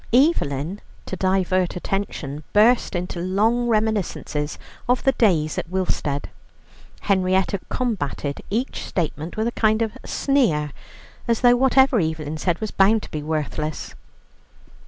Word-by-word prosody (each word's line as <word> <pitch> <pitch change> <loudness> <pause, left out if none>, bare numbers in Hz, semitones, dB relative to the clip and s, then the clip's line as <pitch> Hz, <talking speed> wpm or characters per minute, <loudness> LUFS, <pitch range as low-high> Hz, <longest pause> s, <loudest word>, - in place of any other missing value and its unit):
Evelyn, 200 - +2 0.2
to - - -4
divert 185 -1 +1
attention, 175 -6 -3
burst 220 0 +4
into 175 0 -3
long 215 +7 +1
reminiscences 210 -9 -1 0.3
of 250 0 +2
the 270 - +4
days 170 - +2
at - - -6
Willstead. 175 -6 -1 0.7
Henrietta 190 0 +1
combated 155 - -2
each 235 +6 -2
statement 165 0 -3
with 220 +1 +1
a - - 0
kind 220 -1 +2
of 220 - -2
sneer, 190 - +1 0.6
as 230 -1 +1
though 245 -1 +6
whatever 265 -1 +4
Evelyn 155 -2 -2
said 175 0 0
was 215 - -3
bound 205 +3 +3
to - - -10
be 150 - -3
worthless. 155 0 -3
190 Hz, 130 wpm, -23 LUFS, 155-225 Hz, 0.7 s, though